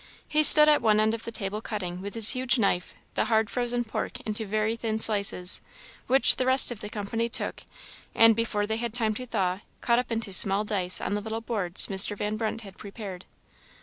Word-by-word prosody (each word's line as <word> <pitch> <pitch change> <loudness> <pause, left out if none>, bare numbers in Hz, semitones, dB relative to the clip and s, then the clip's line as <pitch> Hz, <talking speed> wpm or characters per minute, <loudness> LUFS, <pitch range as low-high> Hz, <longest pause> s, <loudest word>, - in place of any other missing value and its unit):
He 305 0 0
stood 300 0 +10
at 300 -1 +3
one 215 -1 +1
end 215 +1 0
of 230 - -7
the 230 - -7
table, 210 -1 -6
cutting, 185 -6 -7
with 200 +2 -9
his 225 -1 +5
huge 255 0 -1
knife, 195 -5 -2 0.2
the - - -1
hard 220 -1 -1
frozen 245 -1 -2
pork 220 - -6
into 215 0 -5
very 215 +2 -2
thin 225 -1 -4
slices, 200 -4 +1 0.5
which 265 +2 +4
the 255 - -2
rest 260 -1 +4
of 230 - -9
the 210 - -8
company 225 +3 -5
took, - - -4 0.5
and, 225 -1 +4
before 210 -2 -3
they 220 +1 -4
had 235 -1 -6
time 220 -3 -1
to 250 +4 -9
thaw, 190 -5 -3 0.2
cut 235 0 0
up 250 - -6
into 225 -3 -4
small 195 +2 +6
dice 190 -4 -1
on - - -4
the 205 - -3
little 220 +1 -6
boards 205 -6 -2
Mr. 200 +1 +2
Van 210 +1 -4
Brunt 225 +1 -5
had 195 -3 -15
prepared. 195 -3 -10
220 Hz, 215 wpm, -25 LUFS, 200-230 Hz, 0.5 s, stood